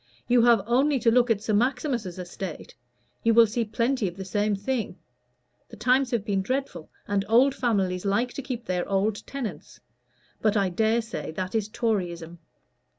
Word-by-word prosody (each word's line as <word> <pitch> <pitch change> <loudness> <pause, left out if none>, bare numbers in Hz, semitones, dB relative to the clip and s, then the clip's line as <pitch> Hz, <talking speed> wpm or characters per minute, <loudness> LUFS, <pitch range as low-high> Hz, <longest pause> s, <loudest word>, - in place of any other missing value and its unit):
You 245 -1 +4
have 235 -5 +5
only 270 +5 +2
to 230 -2 +3
look 245 +1 +3
at 215 -2 +1
Sir 215 - -1
Maximus's 240 - 0
estate: 180 -1 -7 0.5
you 230 -1 +3
will 230 0 +8
see 230 +2 -1
plenty 230 +1 0
of 175 +1 -7
the 190 - -6
same 205 +2 0
thing. 225 +4 -3 0.7
The - - -12
times 255 +1 +2
have 230 -4 -1
been 195 -2 0
dreadful 255 - -3 0.2
and 200 -1 0
old 255 +4 +5
families 195 -9 0
like 210 +5 0
to - - -5
keep 250 -3 -5
their 180 -1 -2
old 200 +2 0
tenants. 270 -6 -6 0.6
But 215 -1 +2
I 195 -2 +2
dare 220 +5 +1
say 225 - -6
that 185 +2 -4
is 215 -2 -1
Toryism." 175 -7 -2
220 Hz, 175 wpm, -26 LUFS, 195-245 Hz, 0.7 s, will